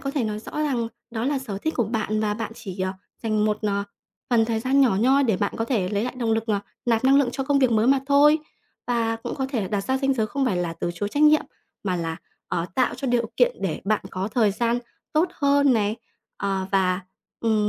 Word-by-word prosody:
có 275 - -3
thể 275 -5 -1
nói 210 -1 -2
rõ 215 - -10
rằng 275 -7 0 0.2
đó 230 0 -3
là 280 0 +1
sở 210 -7 -5
thích 315 +8 -2
của 240 - +2
bạn 215 -1 -1
và 210 -1 0
bạn 225 0 -4
chỉ, 195 -5 -8
ờ, 185 0 0 0.3
dành 215 -1 +1
một, 210 0 +1
ờ, 200 -1 0 0.5
phần 230 -2 +4
thời 225 -1 -1
gian 270 +3 +2
nhỏ 240 -8 +4
nhoi 270 +4 +4
để 220 -6 +2
bạn 205 - -1
có 225 - -1
thể 225 -7 0
lấy 205 +3 0
lại 250 - -4
động 230 -2 +1
lực, 225 0 0
ờ, 205 -2 +1 0.3
nạp 230 +1 +2
năng 270 +1 +6
lượng 280 -3 +4
cho 270 - -2
công 280 0 +2
việc 260 -3 +3
mới 220 +2 +3
mà 270 0 +4
thôi. 290 +2 +5 0.5
Và 230 -2 0
cũng 225 - -5
có 265 -2 -2
thể 245 -6 0
là 190 - -4
đặt 205 -2 0
ra 265 0 0
ranh 275 0 +1
giới 220 -4 0
không 270 +5 -1
phải 190 - +1
là 175 -2 -1
từ 175 - -3
chối 205 +4 -2
trách 290 +7 0
nhiệm, 305 0 +6 0.4
mà 185 -2 0
là, 165 -1 -3 0.3
ờ, 170 - -1
tạo 255 - +2
cho 275 - -5
điều 235 -2 +1
kiện - - +3
để 175 -5 -2
bạn 215 +1 0
có 190 +2 -3
thời 220 -3 +2
gian 235 +4 0 0.3
tốt 315 +3 +3
hơn 285 -2 +3
này, 215 -1 +1 0.4
ờ, 195 -1 -1
và, 185 -1 +2 0.4
ừm, 215 -2 +2
225 Hz, 255 wpm, -24 LUFS, 205-265 Hz, 0.5 s, năng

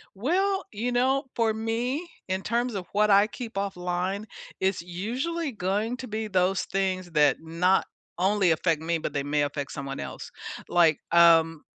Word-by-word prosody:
Well, 380 - +1
you 230 +4 -2
know, 260 +3 +2
for 225 -2 +2
me, 235 +8 -2 0.2
in 190 0 -1
terms 235 +3 -1
of 185 -2 -4
what 210 +1 +3
I 200 +1 +6
keep 230 +1 -8
offline, 190 +1 -2 0.3
it's 190 -1 0
usually 255 - -3
going 210 +4 -1
to 260 - -7
be 220 0 -3
those 185 -1 +1
things 185 -2 -2
that 150 -3 +4
not 170 +4 +2 0.3
only 190 0 +3
affect 160 -1 +1
me, 165 +1 0
but 160 - -4
they 140 - -1
may 145 +1 +1
affect 145 -1 -3
someone 140 -1 -5
else. - - -7 0.4
Like, 165 -4 +4
um, 165 -2 +5
195 Hz, 165 wpm, -26 LUFS, 170-230 Hz, 0.4 s, I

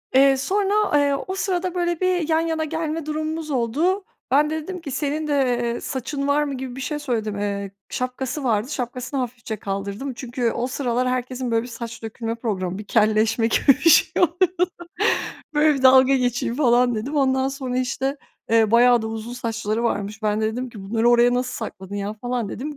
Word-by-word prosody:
Eee, 270 0 +6
sonra, 400 +3 +1
eee, 285 -1 +3
o 380 - -3
sırada 365 -2 -1
böyle 345 -2 0
bir 360 -3 +1
yan 320 0 +3
yana 325 -1 -1
gelme 320 0 -3
durumumuz 310 0 -3
oldu. 300 - +1 0.3
Ben 295 +2 +4
de 315 0 -3
dedim 365 0 -6
ki, 280 - -6
"Senin 300 +3 -2
de, 295 - 0
eee, 240 -3 0
saçın 275 +2 -3
var 295 +1 +3
mı?" 285 -2 -3
gibi 255 -1 -6
bir 265 - -6
şey 295 +2 -3
söyledim. 220 -7 -2
Eee, 200 -1 -3 0.2
şapkası 255 +3 -3
vardı, 225 +1 +1
şapkasını 255 +1 -3
hafifçe 235 -3 -4
kaldırdım. 200 +7 -4
Çünkü 240 -1 -2
o 245 - -2
sıralar 250 -1 -1
herkesin 255 -1 -2
böyle 225 0 +2
bir - - -8
saç 235 -1 -7
dökülme 225 +1 -4
problemi, 190 -5 -3
bir 210 - -6
kelleşme 220 +2 +2
gibi 230 - 0
bir 295 +5 +6
şeyi 360 - +5
vardı. 355 +1 +2 0.9
Böyle 300 0 +4
bir 265 - -4
dalga 260 +1 +7
geçeyim 245 -1 0
falan 245 -3 +3
dedim. 265 +8 -3
Ondan 265 -1 +2
sonra, 260 -2 -3
işte, 265 +2 -1 0.3
eee, 225 -2 +4
bayağı 240 0 +5
da - - -3
uzun 225 +2 -5
saçları 230 -2 -2
varmış. 210 -1 -2
Ben 210 0 +1
de - - 0
dedim 250 +2 -4
ki, 210 -4 -10
"Bunları 225 +3 +2
oraya 240 +1 +5
nasıl 250 +1 -1
sakladın 190 +1 -9
ya?" 200 +1 -3
falan 240 0 -3
dedim. 290 +7 -5
255 Hz, 190 wpm, -23 LUFS, 230-295 Hz, 0.9 s, dalga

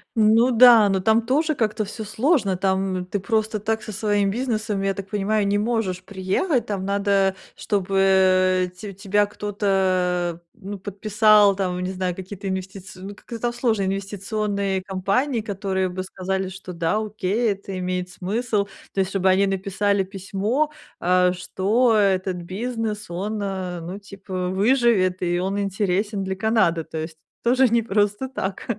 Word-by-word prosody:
Ну 225 +3 +5
да, 235 -3 +7
но 190 -1 +1
там 220 +4 +3
тоже 310 +5 +1
как-то 215 -2 -1
всё 220 +2 -7
сложно. 215 - +1
Там 190 -1 0
ты 200 +3 -3
просто 220 +1 -1
так 220 +1 -2
со 215 - -6
своим 205 -1 +1
бизнесом, 215 -4 -2
я 195 0 0
так 195 -1 -6
понимаю, 210 0 0
не 200 +1 +2
можешь 210 -5 -1
приехать. 200 - -1
Там 200 -3 -3
надо, 200 -1 +1 0.2
чтобы 185 -2 +2
те 200 +2 -8
тебя 200 +2 +1
кто-то, 185 -4 0
ну, 205 -2 -8
подписал. 210 +1 +4
Там, 180 -2 -2
не 185 - -2
знаю, 185 -1 -2
какие-то 190 +2 -7
инвестици 190 0 -6
ну, 195 +2 -7
как-то 230 +2 -9
там 240 +1 -1
сложные 225 -5 0
инвестиционные 200 0 -2
компании, 200 +7 -1
которые 195 -2 -2
бы 185 +1 -4
сказали, 190 0 -3
что: 185 -1 -9
"Да, 170 +4 0
окей, 215 +1 0
это 195 -1 -6
имеет 180 0 -2
смысл". 205 +3 -1 0.3
То - - -2
есть 190 - -2
чтобы 190 -1 +2
они 195 +2 +4
написали 195 +1 0
письмо, 200 +9 -2 0.3
э, 180 0 +3
что 210 +6 +1
этот 190 -3 +2
бизнес, 210 +3 -4
он, 205 +5 -3
э, 185 -3 -3
ну, 180 +4 -6
типа 195 -2 -5
выживет, 200 -3 +2
и 175 0 0
он 195 +2 -1
интересен 200 +1 -1
для 190 0 -3
Канады, 190 -5 +2
то 160 - -8
есть 160 0 -5 0.3
тоже 255 +2 +4
не 235 +1 +3
просто 205 +3 0
так. 195 -7 -4
195 Hz, 155 wpm, -23 LUFS, 185-215 Hz, 0.3 s, да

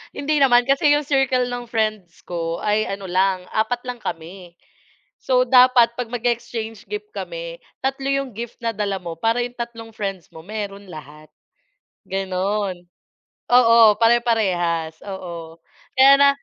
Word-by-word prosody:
Hindi 300 +1 0
naman 245 -3 +5
kasi 290 +2 +3
yung 295 0 +1
circle 260 -3 +2
ng 245 -1 -5
friends 215 -6 -2
ko 165 -1 -4
ay 215 +1 +1
ano 195 0 -5
lang, 185 0 +1
4 240 +3 -1
lang 250 -1 -6
kami. 175 0 -8 0.6
So, 255 -1 +1
dapat 250 -2 +5
'pag 245 -1 -5
mag-e-exchange 230 -2 -3
gift 420 0 -6
kami - - -6 0.2
3 270 0 -2
yung 275 -1 -1
gift 235 +1 -7
na 230 -1 -1
dala 200 -2 -2
mo 170 -2 -7
para 225 +6 0
yung 245 0 -4
tatlong 230 -1 -7
friends 195 -4 -5
mo 160 0 -13
meron 200 -1 -6
lahat, 155 0 -12 0.7
gano'n. 190 -1 -2 0.7
Oo, 230 -3 +6
pare-parehas, 190 -9 +1
oo. 170 -4 -8 0.4
Kaya 275 +1 +8
na 280 - +7
225 Hz, 140 wpm, -21 LUFS, 185-245 Hz, 0.7 s, Kaya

